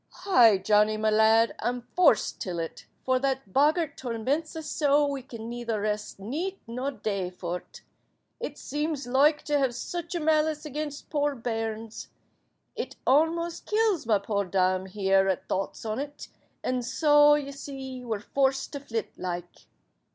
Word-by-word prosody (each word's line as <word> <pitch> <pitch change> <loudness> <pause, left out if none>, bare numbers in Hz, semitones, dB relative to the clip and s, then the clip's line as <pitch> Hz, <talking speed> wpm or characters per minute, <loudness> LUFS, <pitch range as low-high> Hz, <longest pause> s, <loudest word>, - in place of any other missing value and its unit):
"Heigh, 235 - +6
Johnny, 210 +2 +3
ma 215 0 +1
lad, 220 +1 +4
I'm 245 0 -2
forc'd 325 - +4
till 180 -2 -3
it, 165 -1 -5 0.2
for 260 0 +2
that 265 -7 -2
boggart 305 +3 +2
torments 260 +7 -2
us 320 -1 -6
soa 290 -1 +3
we 280 -1 -2
can 230 -3 -9
neither 235 -2 -3
rest 210 0 -3
neet 325 - -4
nor 250 +4 -3
day 200 -8 -3
for't. 180 -1 -7 0.6
It 485 - -5
seems 295 0 -3
loike 285 +5 +3
to 295 -1 +1
have 260 -3 +1
such 345 +6 -5
a - - 0
malice 310 -1 +1
again't 295 0 -5
poor 290 -1 +1
bairns. 225 -2 -4 0.7
It - - -5
ommost 330 +5 +2
kills 425 - +1
my 215 -3 +4
poor 200 0 -1
dame 185 0 +1
here 195 -1 +2
at 190 - -2
thoughts 195 +4 -3
on't, 280 +7 -4 0.3
and 250 -1 -1
soa, 295 +3 +5
ye 280 -1 -5
see, 270 -2 -7
we're 220 -4 -3
forc'd 270 +3 0
to 285 - -5
flitt 230 -6 -4
like." 175 -1 -6
255 Hz, 155 wpm, -27 LUFS, 215-295 Hz, 0.7 s, Heigh